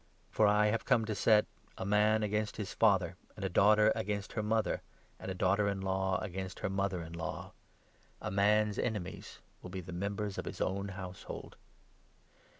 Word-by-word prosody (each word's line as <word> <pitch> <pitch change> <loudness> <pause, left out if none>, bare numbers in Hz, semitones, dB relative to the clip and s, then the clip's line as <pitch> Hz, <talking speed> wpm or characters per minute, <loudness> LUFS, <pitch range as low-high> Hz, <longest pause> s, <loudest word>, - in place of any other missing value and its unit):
For 110 - +4
I 105 +1 +4
have 110 +1 0
come 115 -2 +3
to 110 - -2
set 105 0 +4 0.2
— - - -31
'a - - -4
man 105 +2 +3
against 105 0 -1
his 105 -3 -4
father, - - +3 0.2
and 95 - -4
a - - 0
daughter 105 +4 +5
against 105 -2 -3
her 110 - -1
mother, 110 0 0 0.4
and - - -6
a 95 - -3
daughter 100 +3 +2
in 100 -1 -1
law 95 0 0
against 95 -2 -5
her 95 - -1
mother 95 -3 -1
in 80 0 -9
law. 85 0 -5 0.7
A - - -4
man's 105 +2 +3
enemies 105 -6 -4 0.2
will 90 - -8
be 95 +1 -5
the 90 0 -9
members 100 +2 -3
of - - -4
his - - -6
own 100 +1 -1
household.' 95 -2 -8
100 Hz, 185 wpm, -33 LUFS, 95-105 Hz, 0.7 s, daughter